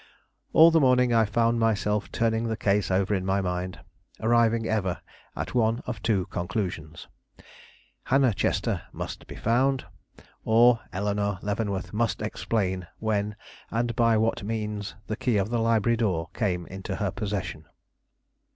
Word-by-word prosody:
All 165 Hz, +1 st, +8 dB
the 165 Hz, -, +4 dB
morning 125 Hz, -3 st, +4 dB
I 115 Hz, -1 st, +4 dB
found 115 Hz, +3 st, +1 dB
myself 105 Hz, -2 st, 0 dB
turning 115 Hz, 0 st, 0 dB
the 110 Hz, -1 st, -2 dB
case 105 Hz, -1 st, +1 dB
over 95 Hz, +2 st, +1 dB
in 95 Hz, -2 st, 0 dB
my 95 Hz, +1 st, +1 dB
mind, 90 Hz, 0 st, -3 dB, 0.4 s
arriving 115 Hz, 0 st, +3 dB
ever 95 Hz, -5 st, -1 dB, 0.4 s
at -, -, -4 dB
one 115 Hz, -1 st, +1 dB
of 115 Hz, -4 st, -5 dB
two 100 Hz, -5 st, +1 dB
conclusions. 85 Hz, -4 st, -4 dB, 1.0 s
Hannah 130 Hz, -3 st, +3 dB
Chester -, -, 0 dB
must -, -, -7 dB
be -, -, -9 dB
found, 130 Hz, +4 st, +1 dB, 0.6 s
or 115 Hz, +1 st, +5 dB
Eleanore 100 Hz, +1 st, -1 dB
Leavenworth 100 Hz, -2 st, -2 dB
must 115 Hz, 0 st, 0 dB
explain 95 Hz, -4 st, -2 dB
when 105 Hz, -1 st, -1 dB, 0.3 s
and 115 Hz, 0 st, -1 dB
by 115 Hz, -1 st, +3 dB
what 110 Hz, +1 st, +1 dB
means 105 Hz, -1 st, -4 dB
the 110 Hz, -, -3 dB
key 120 Hz, -1 st, 0 dB
of 100 Hz, +3 st, -1 dB
the 120 Hz, -, +1 dB
library 115 Hz, 0 st, +2 dB
door 90 Hz, -8 st, -1 dB
came 90 Hz, -5 st, -1 dB
into 95 Hz, 0 st, -6 dB
her 105 Hz, -4 st, -1 dB
possession. 95 Hz, -7 st, -4 dB
110 Hz, 145 wpm, -26 LUFS, 100-115 Hz, 1.0 s, All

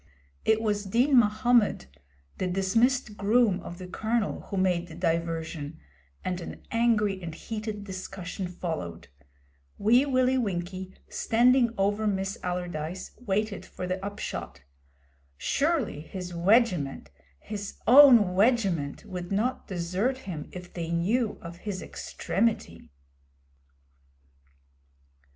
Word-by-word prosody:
It 220 Hz, 0 st, +3 dB
was 205 Hz, -2 st, 0 dB
Din 245 Hz, +8 st, +3 dB
Mahommed, 220 Hz, -, +3 dB, 0.5 s
the 185 Hz, -, 0 dB
dismissed 215 Hz, +5 st, +1 dB
groom 210 Hz, -1 st, +3 dB
of 175 Hz, -, -8 dB
the 185 Hz, -, -8 dB
Colonel, 220 Hz, +4 st, -1 dB
who 200 Hz, -, -3 dB
made 180 Hz, -2 st, +1 dB
the 160 Hz, -, -10 dB
diversion, 165 Hz, -2 st, -2 dB, 0.5 s
and 180 Hz, -1 st, -2 dB
an -, -, -9 dB
angry 215 Hz, -4 st, +2 dB
and 165 Hz, -2 st, -6 dB
heated 215 Hz, 0 st, -5 dB
discussion 190 Hz, -1 st, -6 dB
followed. 160 Hz, -, -5 dB, 0.7 s
Wee 240 Hz, +7 st, +4 dB
Willie 255 Hz, -1 st, +3 dB
Winkie, 185 Hz, -3 st, -3 dB
standing 240 Hz, +1 st, +3 dB
over 205 Hz, +2 st, +1 dB
Miss 195 Hz, -1 st, -1 dB
Allardyce, 180 Hz, -1 st, -4 dB, 0.2 s
waited 205 Hz, +1 st, -1 dB
the 185 Hz, +1 st, -3 dB
upshot. 90 Hz, -, -5 dB, 0.7 s
Surely 280 Hz, -, 0 dB
his 180 Hz, +2 st, -7 dB
'wegiment,' 175 Hz, -, +2 dB, 0.3 s
his 205 Hz, -2 st, -6 dB
own 245 Hz, -7 st, +8 dB
'wegiment,' 195 Hz, -, +1 dB
would 180 Hz, 0 st, -6 dB
not 225 Hz, +6 st, 0 dB
desert 185 Hz, +8 st, -1 dB
him 160 Hz, -6 st, -6 dB
if 180 Hz, -1 st, -9 dB
they 165 Hz, -2 st, -4 dB
knew 205 Hz, +8 st, +1 dB
of 170 Hz, 0 st, -8 dB
his 195 Hz, 0 st, -5 dB
extremity. 180 Hz, -, -2 dB
195 Hz, 110 wpm, -28 LUFS, 175-225 Hz, 0.7 s, own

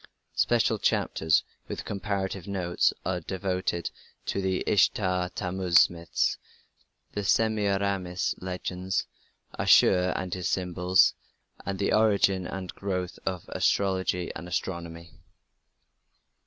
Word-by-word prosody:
Special -, -, +2 dB
chapters, 80 Hz, -2 st, +2 dB, 0.2 s
with -, -, -5 dB
comparative 100 Hz, -2 st, -3 dB
notes, 90 Hz, -3 st, +1 dB
are 90 Hz, -1 st, 0 dB
devoted 90 Hz, -1 st, -2 dB, 0.3 s
to 100 Hz, -, -1 dB
the 95 Hz, -1 st, 0 dB
Ishtar 90 Hz, -3 st, +2 dB
Tammuz 90 Hz, -3 st, +3 dB
myths, 85 Hz, -3 st, -1 dB, 0.7 s
the 105 Hz, -, -3 dB
Semiramis 100 Hz, -3 st, +1 dB
legends, 90 Hz, 0 st, -3 dB, 0.5 s
Ashur 90 Hz, 0 st, +5 dB
and 95 Hz, -1 st, -3 dB
his 90 Hz, -3 st, -2 dB
symbols, 90 Hz, 0 st, +3 dB, 0.5 s
and 100 Hz, -1 st, -2 dB
the 100 Hz, -, 0 dB
origin 100 Hz, -4 st, +3 dB
and 95 Hz, -1 st, -6 dB
growth 90 Hz, -2 st, -3 dB
of 90 Hz, -3 st, -2 dB
astrology 95 Hz, -2 st, 0 dB
and 85 Hz, +3 st, -7 dB
astronomy. 85 Hz, -1 st, -4 dB
95 Hz, 100 wpm, -27 LUFS, 90-95 Hz, 0.7 s, Ashur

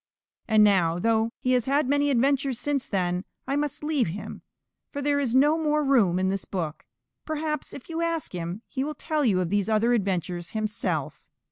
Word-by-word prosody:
And 215 Hz, -2 st, +5 dB
now, 180 Hz, -5 st, +3 dB
though 225 Hz, +3 st, +2 dB
he 255 Hz, -, -1 dB
has 250 Hz, -2 st, +2 dB
had 280 Hz, 0 st, +2 dB
many 285 Hz, +1 st, +2 dB
adventures 270 Hz, -1 st, +1 dB
since 285 Hz, -2 st, -1 dB
then, 180 Hz, -2 st, -1 dB, 0.2 s
I 275 Hz, -, -1 dB
must 295 Hz, 0 st, -2 dB
leave 300 Hz, -, +1 dB
him, 180 Hz, +6 st, -6 dB, 0.5 s
for 285 Hz, -, -4 dB
there 285 Hz, 0 st, +1 dB
is 255 Hz, -4 st, 0 dB
no 295 Hz, +4 st, +4 dB
more 300 Hz, -1 st, +1 dB
room 230 Hz, -11 st, +3 dB
in 190 Hz, 0 st, +1 dB
this 195 Hz, 0 st, -2 dB
book. 165 Hz, -5 st, -5 dB, 0.4 s
Perhaps 310 Hz, -1 st, -3 dB
if 265 Hz, -, -10 dB
you 330 Hz, 0 st, -3 dB
ask 335 Hz, -6 st, -2 dB
him, 175 Hz, +5 st, -5 dB
he 265 Hz, -, -3 dB
will 300 Hz, +2 st, -4 dB
tell 305 Hz, +1 st, -1 dB
you 205 Hz, -8 st, +3 dB
of 175 Hz, -1 st, -2 dB
these 205 Hz, 0 st, +1 dB
other 220 Hz, +2 st, +3 dB
adventures 180 Hz, -5 st, -2 dB
himself. 215 Hz, 0 st, -2 dB
245 Hz, 195 wpm, -26 LUFS, 195-285 Hz, 0.5 s, And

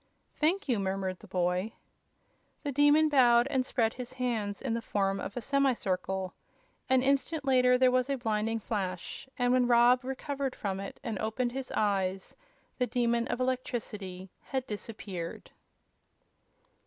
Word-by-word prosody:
"Thank 350 Hz, +6 st, +1 dB
you," 240 Hz, -6 st, +1 dB
murmured 190 Hz, -1 st, -2 dB
the -, -, -14 dB
boy. 180 Hz, +4 st, 0 dB, 0.9 s
The 290 Hz, -, -2 dB
Demon 290 Hz, +3 st, +5 dB
bowed 245 Hz, -5 st, +5 dB
and 260 Hz, -2 st, +2 dB
spread 230 Hz, -3 st, 0 dB
his 250 Hz, 0 st, -7 dB
hands 230 Hz, -6 st, -2 dB
in 260 Hz, -4 st, -2 dB
the 230 Hz, -, -1 dB
form 195 Hz, -3 st, 0 dB
of 200 Hz, -, -6 dB
a -, -, -2 dB
semi 275 Hz, +2 st, +2 dB
circle. 190 Hz, -3 st, -2 dB, 0.6 s
An 260 Hz, -1 st, +4 dB
instant 280 Hz, +2 st, +1 dB
later 250 Hz, -1 st, +5 dB
there 255 Hz, 0 st, +5 dB
was 255 Hz, +1 st, +1 dB
a 275 Hz, -, 0 dB
blinding 225 Hz, -1 st, -1 dB
flash, 200 Hz, +1 st, -4 dB
and 245 Hz, -1 st, +2 dB
when 250 Hz, -1 st, +3 dB
Rob 245 Hz, +1 st, +5 dB
recovered 270 Hz, +1 st, -3 dB
from 195 Hz, -2 st, -3 dB
it 195 Hz, -, -7 dB
and 225 Hz, -6 st, -3 dB
opened 230 Hz, +3 st, -1 dB
his 265 Hz, 0 st, -5 dB
eyes 195 Hz, -2 st, 0 dB, 0.4 s
the 250 Hz, -, +2 dB
Demon 235 Hz, -1 st, +1 dB
of 245 Hz, -, -2 dB
Electricity 210 Hz, -7 st, -3 dB
had 265 Hz, -2 st, -3 dB
disappeared. 205 Hz, -6 st, -6 dB
240 Hz, 155 wpm, -30 LUFS, 200-260 Hz, 0.9 s, Demon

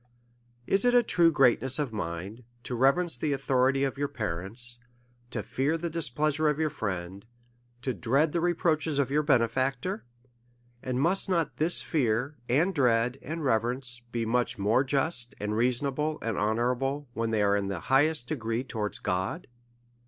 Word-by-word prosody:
Is 195 Hz, +7 st, +2 dB
it 245 Hz, 0 st, +3 dB
a 245 Hz, -, +6 dB
true 170 Hz, -6 st, +3 dB
greatness 130 Hz, -2 st, +3 dB
of 145 Hz, -6 st, -2 dB
mind 95 Hz, +5 st, -5 dB, 0.2 s
to -, -, -5 dB
reverence 135 Hz, +5 st, +2 dB
the 145 Hz, +3 st, -1 dB
authority 135 Hz, 0 st, +1 dB
of 135 Hz, 0 st, -2 dB
your 145 Hz, -, 0 dB
parents, 110 Hz, +3 st, -2 dB, 0.5 s
to -, -, -3 dB
fear 145 Hz, +5 st, -1 dB
the 170 Hz, 0 st, -4 dB
displeasure 155 Hz, 0 st, 0 dB
of 150 Hz, -, 0 dB
your 155 Hz, -1 st, 0 dB
friend, 95 Hz, -3 st, -4 dB, 0.6 s
to 130 Hz, -, -1 dB
dread 135 Hz, +7 st, +1 dB
the 170 Hz, -, -1 dB
reproaches 165 Hz, -3 st, +1 dB
of 140 Hz, -2 st, +1 dB
your 150 Hz, +2 st, +3 dB
bene 135 Hz, -6 st, +3 dB
factor? 135 Hz, -, -2 dB, 0.8 s
and 125 Hz, 0 st, -2 dB
must 185 Hz, +7 st, +2 dB
not 170 Hz, -4 st, 0 dB
this 165 Hz, +3 st, +2 dB
fear, 130 Hz, -1 st, 0 dB
and 160 Hz, +10 st, +2 dB
dread, 125 Hz, -3 st, +2 dB
and 155 Hz, +1 st, -5 dB
rever 115 Hz, -1 st, +2 dB
ence, 125 Hz, -1 st, -8 dB
be 115 Hz, -1 st, -2 dB
much 120 Hz, +1 st, 0 dB
more 105 Hz, +6 st, +2 dB
just, 135 Hz, -2 st, +3 dB
and 105 Hz, +1 st, -2 dB
reasonable, 135 Hz, +6 st, 0 dB
and 115 Hz, -2 st, -1 dB
honour 110 Hz, +5 st, +1 dB
able, 135 Hz, +3 st, -3 dB
when 115 Hz, 0 st, -2 dB
they 110 Hz, -2 st, +1 dB
are 100 Hz, 0 st, +3 dB
in 100 Hz, -1 st, -1 dB
the 95 Hz, -3 st, -4 dB
highest 135 Hz, +2 st, +2 dB
degree 115 Hz, -5 st, -2 dB
towards 110 Hz, -5 st, -4 dB
God 95 Hz, -, -2 dB
130 Hz, 170 wpm, -28 LUFS, 115-150 Hz, 0.8 s, a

